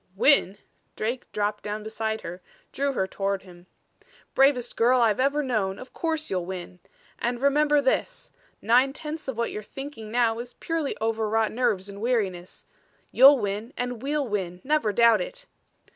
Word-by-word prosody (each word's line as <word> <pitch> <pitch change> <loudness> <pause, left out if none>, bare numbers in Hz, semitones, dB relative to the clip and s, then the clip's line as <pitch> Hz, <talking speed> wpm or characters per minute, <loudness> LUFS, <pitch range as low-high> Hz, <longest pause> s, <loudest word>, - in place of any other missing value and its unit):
"Win?" 205 -4 +4 0.4
Drake 240 +4 -4
dropped 210 0 -2
down 210 0 -4
beside 220 0 -3
her, 180 +2 -8 0.3
drew 280 0 -1
her 190 - 0
toward 195 0 -2
him. 175 -1 -16 0.7
"Bravest 265 -3 +3
girl 250 +2 +4
I've 225 -2 +3
known 255 -9 0
of 255 - -11
course 320 -2 -2
you'll 180 -2 -2
win. 180 -1 -7 0.4
And 240 0 -1
remember 295 +2 +3
this 280 - -1 0.3
nine 250 +5 +4
tenths 305 +1 -7
of 265 -4 -4
what 235 - -1
you're 210 - -5
thinking 240 -1 -8
now 230 -1 +1
is 245 +1 -8
purely 325 -4 -3
over 220 -1 -1
wrought 220 0 +1
nerves 210 -5 0
and 200 0 -9
weariness. 195 -7 -2 0.5
You'll 275 +3 +8
win 210 +2 -3
and 245 -2 -3
we'll 285 0 -1
win, 185 -5 -3
never 295 -6 +1
doubt 235 +2 +5
it." - - -7
235 Hz, 160 wpm, -26 LUFS, 205-275 Hz, 0.7 s, You'll